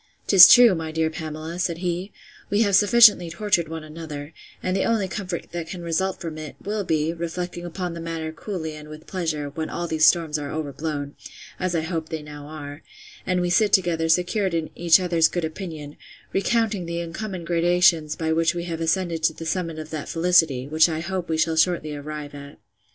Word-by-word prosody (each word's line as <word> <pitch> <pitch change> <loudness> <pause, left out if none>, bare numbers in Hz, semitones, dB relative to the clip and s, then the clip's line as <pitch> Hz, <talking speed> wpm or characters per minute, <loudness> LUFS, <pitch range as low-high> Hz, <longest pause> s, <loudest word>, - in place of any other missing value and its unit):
'Tis 185 -3 +10
true, 245 -4 +8
my 160 -2 -4
dear 160 0 0
Pamela, 155 +2 -6
said 170 -2 -1
he, 180 +2 -3 0.4
we 205 +2 +2
have 200 -3 +2
sufficiently 205 -4 +6
tortured 170 -2 0
one 160 -1 -6
another; 155 -1 -8 0.3
and 185 0 -1
the 195 - +1
only 220 -4 +1
comfort 185 -2 -5
that 170 -1 -5
can 175 0 -7
result 185 +3 -1
from 160 -2 -6
it, 155 -2 -8
will 205 0 -3
be, 160 -2 0
reflecting 175 +1 -5
upon 175 0 -4
the 170 - -7
matter 165 -1 -4
coolly 160 -2 -5
and 150 0 -11
with 155 0 -11
pleasure, 160 -6 -3
when 160 +2 -4
all 175 - -3
these 155 -1 +4
storms 160 -3 +2
are 145 -1 -5
overblown, 145 -1 -4 0.4
(as 185 -1 -1
I 165 - +1
hope 160 -1 -4
they 160 -2 -5
now 145 -1 -10
are,) 145 -1 -8 0.5
and 180 -1 +1
we 175 0 -1
sit 210 +3 +3
together 165 -3 +2
secured 180 +2 +1
in 160 -1 -2
each 170 +1 +4
other's 170 -3 +3
good 175 -2 -3
opinion, 160 -3 -7 0.4
recounting 210 -3 0
the 170 0 -3
uncommon 170 +1 -5
gradations 170 -2 +3
by 160 0 -1
which 165 +1 +1
we 170 - -3
have 165 -2 -5
ascended 165 0 0
to 160 - +2
the 165 - -9
summit 165 -1 -2
of 155 0 -8
that 155 -2 -5
felicity, 165 -6 +2
which 155 +3 +4
I 160 0 -3
hope 180 0 -4
we 160 - 0
shall 160 0 +1
shortly 160 -2 +1
arrive 145 0 -7
at. 140 0 -11
165 Hz, 200 wpm, -23 LUFS, 155-180 Hz, 0.5 s, Tis